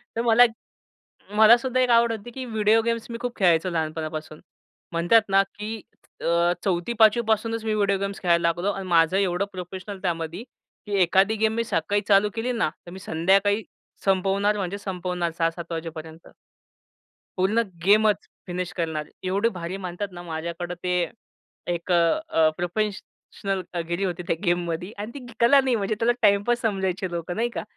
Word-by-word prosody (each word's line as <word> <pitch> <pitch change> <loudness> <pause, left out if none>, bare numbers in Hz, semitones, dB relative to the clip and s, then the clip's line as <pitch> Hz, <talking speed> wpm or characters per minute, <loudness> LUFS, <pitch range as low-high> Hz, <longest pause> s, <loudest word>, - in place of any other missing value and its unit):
तर 230 - 0
मला 235 +1 +6
एक 235 - +3 0.9
मला 220 +2 +8
सुद्धा 255 +1 -1
एक 250 - +2
आवड 235 0 +5
होती, 225 +2 -6
की 260 +1 -6
व्हिडिओ 220 -1 +3
गेम्स 230 0 -2
मी 230 - -4
खूप 245 -1 -3
खेळायचो 175 -1 +3
लहानपणापासून. 155 -1 -4 0.5
म्हणतात 175 +7 +4
ना 195 0 +5
की 215 +1 -5 0.4
अ, 170 +1 +2
चौथी, 185 +4 -1
पाचवी 220 +2 +5
पासूनच 225 +1 0
मी 215 - 0
व्हिडिओ 200 -2 +2
गेम्स 200 0 -4
खेळायला 170 -2 +3
लागलो 175 +4 0
आणि 195 -1 -6
माझं 170 +1 +3
एवढं 195 0 +1
प्रोफेशनल 185 +2 -7
त्यामध्ये 170 +2 -3 0.4
की 205 -1 -2
एखादी 190 +5 +3
गेम 220 0 +2
मी 230 - 0
सकाळी 205 -1 0
चालू 205 0 +4
केली 240 +3 -1
ना, 230 -9 0 0.2
तर - - -9
मी 190 - -9
संध्याकाळी, 195 +5 +2 0.4
संपवणार 195 +2 +2
म्हणजे 195 0 -3
संपवणार 180 -3 -3
6:00-7:00 165 0 -2
वाजेपर्यंत. 160 0 -7 1.1
पूर्ण 210 +5 +2 0.2
गेमच 210 +1 +4 0.2
फिनिश 180 0 -4
करणार. 160 -3 -2 0.2
एवढे 200 +5 +1
भारी 180 -2 -5
म्हणतात 185 +1 -5
ना 175 0 -9
माझ्याकडं 170 +1 -5
ते 180 - -1 0.8
एक 170 +2 -3
अ, 170 - +3
अ, 160 -1 +4
प्रोफेशनलगिरी 185 -2 -3
होती 175 -1 -3
त्या 165 - +1
गेममध्ये 175 +2 -1
आणि 210 +2 -5
ती 260 -3 -9
कला 275 +4 +6
नाही 260 -2 +1
म्हणजे 205 +1 -1
त्याला 235 +1 +3
टाईमपास 210 +3 +3
समजायचे 190 -4 -1
लोकं 170 +1 -4
नाही 235 +2 +1
का? 235 - -5
195 Hz, 165 wpm, -24 LUFS, 175-220 Hz, 1.1 s, मला